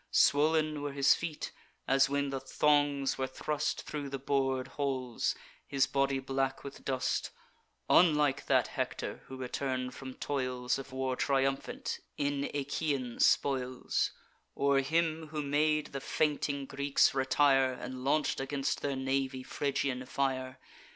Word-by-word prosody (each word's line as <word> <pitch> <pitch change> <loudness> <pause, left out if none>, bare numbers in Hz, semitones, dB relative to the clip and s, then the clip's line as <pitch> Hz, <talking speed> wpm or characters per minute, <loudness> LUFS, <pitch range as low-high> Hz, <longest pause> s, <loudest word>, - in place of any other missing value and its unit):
Swoln 155 0 +3
were 145 -1 -3
his 140 0 +5
feet, 165 -3 -4 0.4
as 135 0 +4
when 140 0 0
the 135 - -2
thongs 145 -2 +2
were 130 - 0
thrust 150 +3 -2
Thro' 145 -2 -5
the 135 - -3
bor'd 135 -1 0
holes; 130 -4 -1 0.3
his 135 -1 +2
body 135 0 +1
black 135 0 -2
with 140 0 -9
dust; 130 -1 -1 0.6
Unlike 150 -5 +4
that - - +3
Hector - - -3
who 130 - -8
return'd 130 0 -3
from 130 -1 -8
toils 130 -2 -1
Of 135 0 -8
war, 130 0 -1
triumphant, 135 0 -1 0.2
in 140 -1 0
Aeacian 140 -3 -2
spoils, 130 -2 +2 0.4
Or 140 0 +3
him 160 +2 0
who 150 -1 -3
made 150 +2 +1
the 135 - -4
fainting 145 -2 0
Greeks 140 +1 +2
retire, 135 0 +3
And 125 0 -7
launch'd 145 +1 +1
against 135 0 -2
their 140 -1 -1
navy 135 0 -1
Phrygian 135 -2 -2
fire. 130 -1 -1
135 Hz, 135 wpm, -31 LUFS, 130-145 Hz, 0.6 s, his